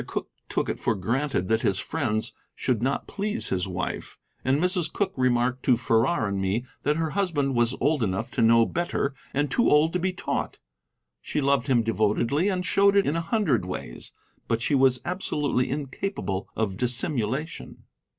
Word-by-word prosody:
Cooke - - -4 0.2
took - - 0
it - - -3
for 115 - +1
granted 115 +1 -1
that 110 0 +2
his 95 - +1
friends 110 -8 -2 0.2
should 120 -4 0
not 135 +3 0
please 210 +3 -3
his 90 0 -1
wife, 95 0 -4 0.3
and 135 +2 +2
Mrs. 180 -2 +2
Cooke 195 -2 -1
remarked 125 0 +1
to 125 -3 +5
Farrar 115 +3 +2
and 100 -1 -2
me 100 +6 0 0.2
that 150 +2 +1
her 160 -1 -1
husband 155 -8 0
was 120 +1 +2
old 145 +1 +2
enough 110 +4 -1
to - - -1
know 115 0 +6
better, 165 -3 -1 0.2
and 145 +1 0
too 235 - +3
old 150 +2 +4
to 180 - +1
be 185 +2 0
taught. 180 - -3 0.6
She - - -2
loved 140 -2 +2
him 125 -4 +3
devotedly 115 - +1
and 180 -2 -1
showed 200 +4 +4
it 200 - +4
in 145 - 0
a 165 - 0
hundred 165 - +1
ways, 90 -9 -6 0.4
but 115 0 0
she - - 0
was 130 -2 +4
absolutely 150 -8 -1
incapable 135 - -3
of 105 -4 -1
dissimulation. 125 +4 -2
130 Hz, 180 wpm, -26 LUFS, 115-160 Hz, 0.6 s, know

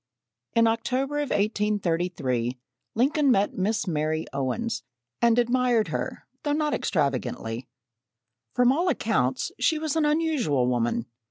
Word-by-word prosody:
In 230 0 +5
October 255 +5 0
of 290 -3 -2
1833, 175 - 0 0.4
Lincoln 280 +5 +3
met 205 -4 +3
Miss 210 +4 0
Mary 155 -1 -1
Owens, 180 - -2 0.4
and 235 0 +4
admired 245 -2 +2
her - - -4 0.2
though 290 -1 0
not 300 0 0
extravagantly. 130 - -1 0.9
From 245 0 +5
all 340 +6 +1
accounts, - - 0
she 320 - +2
was 310 -1 -2
an 320 -2 +2
unusual 295 - +1
woman. 120 -1 0
225 Hz, 120 wpm, -26 LUFS, -, 0.9 s, In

